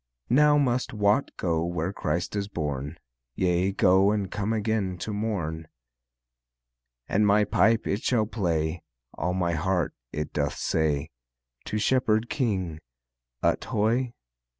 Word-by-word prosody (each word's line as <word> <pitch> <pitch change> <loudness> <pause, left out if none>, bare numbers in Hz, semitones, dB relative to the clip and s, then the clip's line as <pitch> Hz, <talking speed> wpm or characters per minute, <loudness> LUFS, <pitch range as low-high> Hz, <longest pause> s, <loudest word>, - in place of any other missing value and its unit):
Now 150 +3 +5
must 130 -2 +1
Wat 105 +5 +2
go 85 -3 0
where 85 +2 -2
Christ 85 +2 -2
is 100 -1 -1
born, 75 -4 -4 0.4
Yea, 90 +1 +1
go 95 +1 +4
and 105 -3 -1
come 105 +1 -2
again 105 -4 -1
to 105 +4 -4
morn. 85 -7 -3 1.4
And 105 +1 +2
my 105 +1 +5
pipe 110 +2 +3
it 100 +3 -1
shall 115 -4 +2
play, 85 -6 -1 0.3
All 90 +1 -2
my 90 -2 0
heart 85 0 0 0.2
it 75 0 -4
doth 70 -2 -1
say 75 -2 0 0.5
To 105 - -2
Shepherd 110 -1 +1
King: 95 - -1 0.6
Ut - - +2
hoy! 115 +3 0
100 Hz, 130 wpm, -26 LUFS, 85-110 Hz, 1.4 s, Now